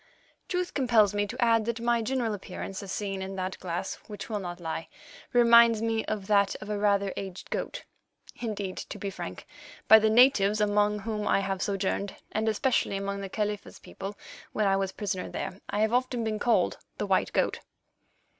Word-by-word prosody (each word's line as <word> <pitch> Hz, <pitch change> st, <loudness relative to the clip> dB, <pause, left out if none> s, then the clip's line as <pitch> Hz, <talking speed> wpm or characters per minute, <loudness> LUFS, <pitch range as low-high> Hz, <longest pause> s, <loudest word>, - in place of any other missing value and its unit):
Truth 360 Hz, 0 st, -2 dB
compels 230 Hz, -7 st, +4 dB
me 205 Hz, 0 st, 0 dB
to 245 Hz, +5 st, -7 dB
add 230 Hz, -2 st, +3 dB
that 235 Hz, 0 st, -2 dB
my 235 Hz, 0 st, +2 dB
general 235 Hz, -1 st, -1 dB
appearance, 195 Hz, -1 st, -6 dB
as 195 Hz, -2 st, -7 dB
seen 195 Hz, -2 st, -3 dB
in 190 Hz, +1 st, -5 dB
that 185 Hz, 0 st, -4 dB
glass 175 Hz, +1 st, -4 dB
which 210 Hz, +1 st, -8 dB
will 210 Hz, -, -1 dB
not 175 Hz, -2 st, -6 dB
lie, 165 Hz, -1 st, -4 dB, 0.4 s
reminds 235 Hz, -2 st, +6 dB
me 225 Hz, 0 st, 0 dB
of 210 Hz, -3 st, -3 dB
that 200 Hz, -1 st, +3 dB
of 210 Hz, 0 st, -6 dB
a 205 Hz, -, -1 dB
rather 200 Hz, -1 st, +2 dB
aged 190 Hz, -2 st, -7 dB
goat; -, -, -3 dB, 0.5 s
indeed, 205 Hz, -5 st, -4 dB
to -, -, -6 dB
be 200 Hz, -, -4 dB
frank, 175 Hz, -2 st, -7 dB, 0.4 s
by 220 Hz, -, +10 dB
the 220 Hz, 0 st, +3 dB
natives 215 Hz, -3 st, +5 dB
among 210 Hz, 0 st, +2 dB
whom 210 Hz, 0 st, -3 dB
I -, -, +3 dB
have 195 Hz, -1 st, -2 dB
sojourned, 200 Hz, 0 st, -1 dB, 0.2 s
and 220 Hz, +1 st, 0 dB
especially 220 Hz, -2 st, +1 dB
among 200 Hz, 0 st, -3 dB
the 195 Hz, -, -5 dB
Khalifa's 210 Hz, 0 st, -3 dB
people 195 Hz, +1 st, -8 dB, 0.4 s
when 215 Hz, -, +1 dB
I 195 Hz, -1 st, +4 dB
was 195 Hz, 0 st, 0 dB
a -, -, -13 dB
prisoner 195 Hz, -3 st, -3 dB
there, 190 Hz, -, -5 dB
I 205 Hz, -, 0 dB
have 220 Hz, +1 st, +2 dB
often 250 Hz, -1 st, +1 dB
been 215 Hz, -1 st, -2 dB
called 235 Hz, -, +2 dB, 0.2 s
the -, -, -1 dB
White -, -, +1 dB
Goat. -, -, +1 dB
210 Hz, 190 wpm, -28 LUFS, 195-225 Hz, 0.5 s, by